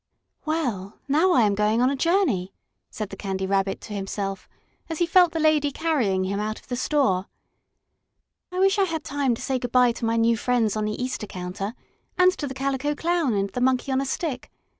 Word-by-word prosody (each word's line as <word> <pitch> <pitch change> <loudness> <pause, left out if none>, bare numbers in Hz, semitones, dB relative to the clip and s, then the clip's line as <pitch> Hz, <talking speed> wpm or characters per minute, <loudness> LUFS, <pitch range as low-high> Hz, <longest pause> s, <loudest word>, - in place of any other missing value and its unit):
"Well, 245 - -2
now 320 +6 +3
I 245 - +5
am 205 -1 +3
going 210 +2 +1
on 255 +2 +3
a - - -1
journey," 275 - +1 0.3
said 215 -2 -5
the - - -6
Candy 190 -1 -3
Rabbit 195 0 0
to 215 - -8
himself, 195 -1 -4 0.4
as 325 - -3
he 345 - +2
felt 355 0 +5
the 325 - -2
lady 305 -2 +3
carrying 260 - 0
him 200 +2 -2
out 215 +1 -3
of - - -25
the 250 - -1
store. 245 -8 +1 1.2
"I 365 - -5
wish 390 +2 +3
I 390 - +4
had 325 -3 -3
time 280 -4 0
to - - -10
say 265 -2 -1
good 245 -1 -4
bye 250 -1 +5
to 230 0 -4
my 225 0 +1
new 230 0 +3
friends 230 -3 +1
on 215 0 -1
the 210 0 -3
Easter 250 -4 -3
counter, 190 +4 -5 0.4
and 365 0 +5
to 290 - -2
the 265 - -6
Calico 275 +2 -1
Clown 330 -7 0
and 200 0 -1
the 250 - -3
Monkey 260 +1 +1
on 265 0 +2
a - - -2
Stick. 270 -3 -3
250 Hz, 215 wpm, -24 LUFS, 205-300 Hz, 1.2 s, I